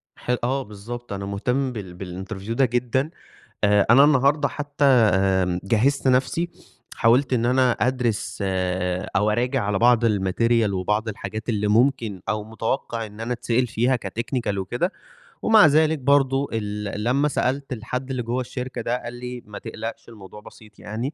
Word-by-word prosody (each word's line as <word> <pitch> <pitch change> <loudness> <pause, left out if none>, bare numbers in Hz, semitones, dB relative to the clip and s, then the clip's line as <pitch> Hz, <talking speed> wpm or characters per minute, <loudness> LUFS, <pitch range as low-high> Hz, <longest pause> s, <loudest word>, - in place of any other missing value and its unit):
ح - - -13
آه 135 +2 0
بالضبط، 115 +2 -8
أنا 100 0 -4
مهتم 125 +7 -1
بال 95 -2 -7
بالinterview 105 0 -6
ده 130 +4 +3
جدًا، 125 +4 0 0.5
آآ 100 -1 +4
أنا 130 +4 +8
النهارده 145 0 +3
حتّى 145 0 -2
آمم 95 -7 +3
جهّزت 125 +8 +1
نَفْسي، 135 +7 +1 0.5
حاولت 125 +4 +3
إن 120 -2 +1
أنا 130 0 +3
أدْرِس 120 -3 -1
آآ 90 -1 -1
أو 105 +2 +3
أراجع 125 +3 0
على 100 -1 0
بعض 120 -1 +4
الmaterial 110 +2 +2
وبعض 105 +4 -1
الحاجات 110 +2 -6
اللي 105 -2 0
ممكن 115 -3 +1
أو 105 0 -1
مُتَوقِّع 115 +1 -3
إن 105 0 -13
أنا 120 +2 -2
أتسأل 120 +1 0
فيها 120 +4 +1
كtechnical 115 +1 -2
وكده. 120 - -1 0.5
ومع 220 -4 +6
ذلك 155 0 +3
برضه 135 0 +2
ال 105 -1 -3
لمّا 135 +5 +2
سألت 135 -1 -1
الحد 125 +3 -5
اللي 130 -2 -2
جوّا 120 +3 -2
الشركة 125 -1 -5
ده 120 +2 -1
قال 120 - -6
لي: 125 0 -7
"ما 105 -1 -9
تقلقش 115 +1 -7
الموضوع 105 -2 -12
بسيط 105 0 -16
يعني." 115 +8 -4
115 Hz, 160 wpm, -23 LUFS, 105-130 Hz, 0.5 s, أنا